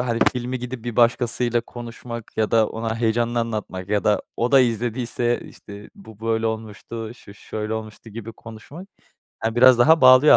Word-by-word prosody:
hani, 120 -2 -1
filmi 125 +1 -3
gidip 125 -1 -7
bir 120 -2 -5
başkasıyla 120 0 +2
konuşmak 115 -1 -9
ya 110 - +1
da 110 -2 +4
ona 115 0 -3
heyecanını 120 +1 +1
anlatmak 105 -5 -4
ya 105 -1 +1
da 105 -1 +2
o 120 +3 0
da 135 - +8
izlediyse, 120 0 -1 0.2
eee, - - -12
işte, 100 0 -12
bu 110 - -15
böyle 115 0 0
olmuştu, 110 0 -5
şu 100 -4 -15
şöyle 110 +1 -5
olmuştu 110 0 -8
gibi 115 +1 -8
konuşmak, 115 - -11 0.5
he, 110 0 -1
biraz 130 0 +7
daha 160 +6 +6
bağlıyor 130 +3 +8
115 Hz, 175 wpm, -22 LUFS, 110-120 Hz, 0.5 s, da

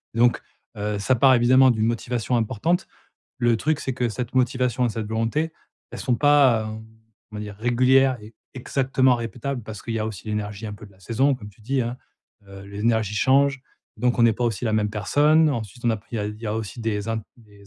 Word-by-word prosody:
Donc, 120 +1 +3 0.4
heu, 105 0 -2
ça 130 - +2
part 130 +1 +5
évidemment 130 +2 +5
d'une 110 -1 0
motivation 120 +1 -1
importante. 130 - 0 0.5
Le 120 -2 +3
truc, 150 +5 0
c'est 130 - -3
que 125 -2 -1
cette 125 +2 -5
motivation 125 -1 +1
et 120 - +1
cette 110 -1 -4
volonté, 115 +9 -1 0.4
elles - - -7
sont 125 -2 0
pas 135 -6 +4
,hem, 110 0 -8 0.5
on - - -9
va - - -4
dire, 105 -1 -7
régulière 130 +3 +3
et 110 +1 -13 0.2
exactement 130 0 +1
répétable 120 +2 -4
parce 105 -1 -8
qu'il 115 -1 -4
y - - -1
a 110 - -1
aussi 110 -1 -7
l'énergie 105 0 -4
un 105 - -6
peu 105 - -11
de 100 - -17
la 95 - -23
saison 130 +8 +1
comme 105 -4 -10
tu 105 - -24
dis, 130 +3 0
hein, 120 +2 -4 0.5
heu, 95 0 -11
l'énergie 105 0 0
change 135 +3 +3 0.4
donc 120 +2 +1
on 115 - +5
n'est 115 -1 +5
pas 120 - -3
aussi 115 -1 -1
la 110 - 0
même 105 -1 +1
personne 150 +9 +3
ensuite 120 -2 -5
on 120 - +4
apprit 110 +1 -5
il 105 +1 -4
y 115 - -4
a 105 - -1
aussi 110 +1 -5
des 105 -2 -2
un 115 - 0 0.2
des 105 -3 -20
115 Hz, 215 wpm, -23 LUFS, 105-130 Hz, 0.5 s, part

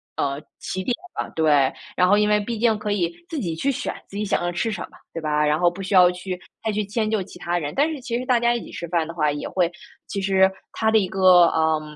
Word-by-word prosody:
呃， 140 +1 -1 0.2
起 190 - -4
点 245 - 0 0.2
吧， - - -3
对。 145 -4 +3 0.2
然 180 0 +3
后 205 - +5
因 210 0 +3
为 210 0 +4
毕 225 +3 -4
竟 225 -1 +2
可 210 0 -3
以 175 -5 0 0.2
自 320 - -3
己 170 -8 -2
去 275 +12 0
选 265 - -3 0.2
自 200 - -7
己 210 - -1
想 195 - 0
要 175 - -1
吃 200 +6 -1
什 210 - -4
么， - - -12 0.2
对 165 - -4
吧， 150 -1 +1
然 150 +1 +2
后 175 0 +4
不 185 +3 -8
需 190 - -4
要 180 -2 +7
去 180 0 -6 0.3
再 220 - +1
去 210 0 -1
迁 215 +2 -1
就 215 -2 +1
其 175 - -13
他 175 0 -1
人。 150 -2 -4
但 295 +3 +3
是 295 -4 -6
其 240 -2 -2
实 250 - -4
大 250 -2 +3
家 240 0 +2
一 235 - -3
起 - - -12
吃 170 - -6
饭 165 -2 0
的 165 - -7
话 150 -3 +1
也 145 0 -4
会 180 -2 0 0.4
其 200 - -3
实 190 0 +4 0.2
它 220 - +1
的 220 - +5
一 200 -3 +2
个， 185 -2 +6
呃， 160 -1 +1
185 Hz, 300 characters per minute, -23 LUFS, 170-215 Hz, 0.4 s, 要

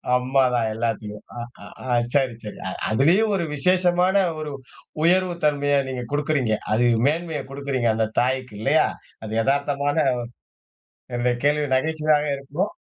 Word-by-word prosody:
அம்மாதான் 125 -2 +2
எல்லாத்துலையும். 110 -2 -3
அ. - - -4 0.2
ஆ. - - -10 0.2
ஆ. 125 - 0 0.2
சரி, 135 -4 +2
சரி. 105 - -8
அ - - -4 0.2
அதுலயும் 175 - +3
ஒரு 175 -3 -1
விசேஷமான 180 +4 +3 0.2
ஒரு 150 -1 -5 0.5
உயர்வு 180 +1 +3
தன்மையா 145 -1 +2
நீங்க 125 -1 -4
குடுக்குறீங்க. 145 -6 +1 0.2
அது 120 +3 +3 0.2
மேன்மையைக் 160 -2 -2
குடுக்குறீங்க 135 -4 -1
அந்தத் 110 0 -2
தாய்க்கு, 125 -2 -2
இல்லையா? 140 +7 +3 0.4
அது 110 +1 -2
எதார்த்தமான 140 +2 0 1.2
என்னுடைய 120 0 +1
கேள்வி 150 0 +2
நகைச்சுவையாக 155 +1 +1
இருக்கணும். 145 +9 -3
140 Hz, 130 wpm, -23 LUFS, 125-155 Hz, 1.2 s, அதுலயும்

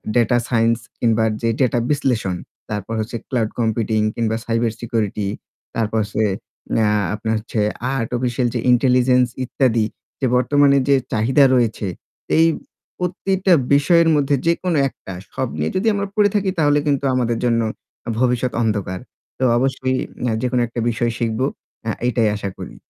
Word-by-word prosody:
Data 120 0 +3
science 115 -1 +2 0.2
কিংবা 115 -1 +2 0.2
যে 115 - +1
data 125 -2 +2
বিশ্লেষণ, 120 -10 0 0.3
তারপর 105 +1 -4
হচ্ছে 115 +2 -3
ক্লাউড 115 -4 0
কম্পিউটিং 110 -1 +1
কিংবা 110 -1 0
সাইবার 115 0 0
সিকিউরিটি 110 -4 -1 0.5
তারপর 110 -1 0
হচ্ছে 105 - -10 0.7
আ - - +3 0.3
আপনার 110 +1 -2
হচ্ছে 110 +1 -4 0.4
আর্টিফিসিয়াল 120 +1 -1
যে - - +1
ইন্টেলিজেন্স 125 0 +4 0.2
ইত্যাদি, 120 -3 +1 0.3
যে 135 - 0
বর্তমানে 140 +2 +4
যে 140 - +6 0.2
চাহিদা 130 +6 +4
রয়েছে 115 -4 0 0.5
এই 165 - +6 0.5
প্রত্যেকটা 185 +1 +1 0.2
বিষয়ের 165 +4 +4
মধ্যে 145 -1 +2
যেকোনো 170 0 +1
একটা 95 - -11 0.2
সব - - -1
নিয়ে 75 +1 -1
যদি 205 +4 0
আমরা 200 0 -1
পড়ে 210 -1 +4
থাকি 200 -2 +1
তাহলে 145 -1 +4
কিন্তু 140 -1 +1
আমাদের 120 -2 0
জন্য 115 -1 +2 0.6
ভবিষ্যৎ 125 0 +1
অন্ধকার। 100 -4 -1 0.4
তো - - -1
অবশ্যই 130 0 0 0.3
অ্যা 120 -2 +1
যেকোনো 125 -1 +1
একটা 120 +1 -6
বিষয় 120 0 0
শিখবো 115 +2 0 0.4
অ্যা 110 -1 -1
এটাই 115 -3 +2
আশা 100 -1 -4
করি। - - -8
120 Hz, 145 wpm, -20 LUFS, 110-135 Hz, 0.7 s, যে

